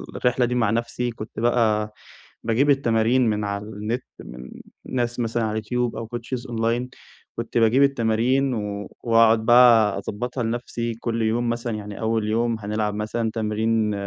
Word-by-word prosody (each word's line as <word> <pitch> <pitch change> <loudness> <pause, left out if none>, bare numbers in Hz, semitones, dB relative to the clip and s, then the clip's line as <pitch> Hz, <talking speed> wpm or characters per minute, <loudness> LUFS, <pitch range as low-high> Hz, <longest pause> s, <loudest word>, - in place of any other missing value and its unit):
الرحلة 125 0 +1
دي 125 +1 -2
مع 115 -4 +2
نفسي، 120 +1 -1
كنت 110 -1 -8
بقى 110 -3 +1 0.5
باجيب 130 +6 +2
التمارين 120 -2 +3
من 105 -1 -1
على 100 0 -3
النت 110 +4 -4 0.2
من 60 +1 -10 0.4
ناس 120 -1 -2
مثلًا 115 0 -1
على 110 - -1
اليوتيوب 120 +3 -2
أو 115 - -5
coaches 120 +2 -5
أونلاين، 115 +2 -1 0.5
كنت - - -3
باجيب 115 +4 +4
التمارين 130 +1 +2
و 105 -2 -4
وأقعُد 115 -1 +4
بقى 115 -4 +6
أضبّطها 120 +5 -4
لنفسي، 115 0 -3
كل 115 0 -3
يوم 115 +2 0
مثلًا 120 0 -2
يعني 105 -1 -8
أول 110 -1 0
يوم 115 +1 0
هنلعب 105 0 -2
مثلًا 110 +1 -2
تمرين 110 0 0
115 Hz, 155 wpm, -23 LUFS, 110-120 Hz, 0.5 s, بقى